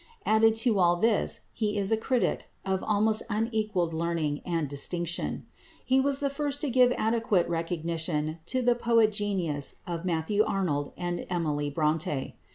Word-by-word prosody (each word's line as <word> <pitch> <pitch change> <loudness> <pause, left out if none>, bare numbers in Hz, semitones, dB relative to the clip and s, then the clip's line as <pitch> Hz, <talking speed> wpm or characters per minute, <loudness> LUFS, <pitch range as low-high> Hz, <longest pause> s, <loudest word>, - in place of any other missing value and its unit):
Added 220 +1 +4
to 220 -5 +3
all 175 -1 +4
this, 215 +4 +1
he 210 -2 -1
is 200 0 0
a - - +5
critic 240 +2 0 0.2
of 190 -1 -1
almost 215 +1 +2
unequalled 215 -6 0
learning 160 -3 -1
and 165 -4 -1
distinction. 170 +5 -2 0.4
He 260 +1 +3
was 275 +1 +1
the 280 - +1
first 285 0 -2
to 290 - -1
give 250 0 +5
adequate 220 -6 +1
recognition 165 -2 -2
to 255 -1 0
the 245 0 +4
poetic 230 -2 +3
genius 185 -9 -2
of 170 -1 -4
Matthew 180 +4 +1
Arnold 150 -9 -1
and 175 -1 -3
Emily 150 -5 -1
Brontë. 150 -1 -1
190 Hz, 155 wpm, -28 LUFS, 165-225 Hz, 0.4 s, a